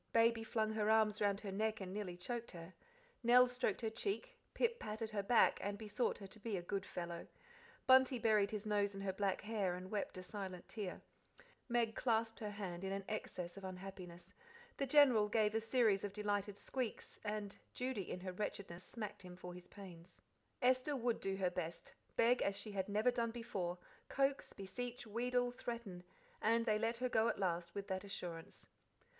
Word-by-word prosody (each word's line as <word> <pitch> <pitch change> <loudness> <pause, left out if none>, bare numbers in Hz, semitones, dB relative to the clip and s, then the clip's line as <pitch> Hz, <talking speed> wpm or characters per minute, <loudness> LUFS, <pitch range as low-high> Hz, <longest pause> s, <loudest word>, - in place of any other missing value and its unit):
Baby 230 0 +5
flung 220 -1 0
her 215 -1 +1
arms 215 -1 +4
round 200 -1 +2
her 200 - -4
neck 220 +2 0
and 190 -1 -5
nearly 195 -4 -3
choked 235 +6 -3
her; 170 +1 -9 0.5
Nell 245 +1 +7
stroked 250 -4 0
her 225 - 0
cheek; 420 - -2 0.2
Pip 470 0 +2
patted 220 +1 -4
her 210 -1 0
back, 225 +4 +5
and 205 0 -2
besought 220 +3 0
her 200 - -8
to 195 +3 -10
"be 215 -2 -2
a - - -2
good 195 +1 -2
fellow"; 170 -1 -5 0.6
Bunty 260 0 +7
buried 215 -3 +4
his 215 0 -4
nose 205 -1 +1
in 195 - -5
her 195 -1 -1
back 195 -1 0
hair 205 -4 0
and 185 +1 -7
wept 205 -3 -2
a 185 - -5
silent 190 -2 -6
tear; 205 -5 -4 0.7
Meg 235 -2 +2
clasped 225 -2 +1
her 210 - -3
hand 195 -4 -5
in 190 - -2
an 195 0 -2
access 180 -4 -4
of 195 - -8
unhappiness; 185 -2 -8 0.4
the 275 - 0
General 255 -7 +6
gave 210 -1 +3
a 225 - +2
series 225 -4 +3
of 200 -1 -3
delighted 205 -1 -1
squeaks; 255 -1 -4
and 210 -1 -3 0.2
Judy 250 -7 -2
in 180 - -4
her 185 0 -3
wretchedness 185 -3 -4
smacked 215 +1 -6
him 180 -1 -9
for 180 -1 -7
his 180 0 -10
pains. 180 -3 -12 0.4
Esther 255 +3 +4
would 240 -2 +1
do 195 0 -1
her 185 -2 +1
best, 170 -2 -4 0.2
beg 240 +2 +4
as 200 0 +1
she 210 +1 -2
had 195 -1 -2
never 215 +4 +3
done 235 -1 0
before, 195 -7 -3 0.3
coax, 275 0 +1
beseech, 240 +6 -5
wheedle, 245 +3 +1
threaten; 235 -7 -5 0.4
and 230 +1 +3
they 215 -2 +3
let 225 +1 +1
her 255 +1 +1
go 225 -2 +3
at - - +1
last 170 -2 -1
with 200 -1 -3
that 190 0 -1
assurance. 175 -4 -6
210 Hz, 190 wpm, -39 LUFS, 190-230 Hz, 0.7 s, Nell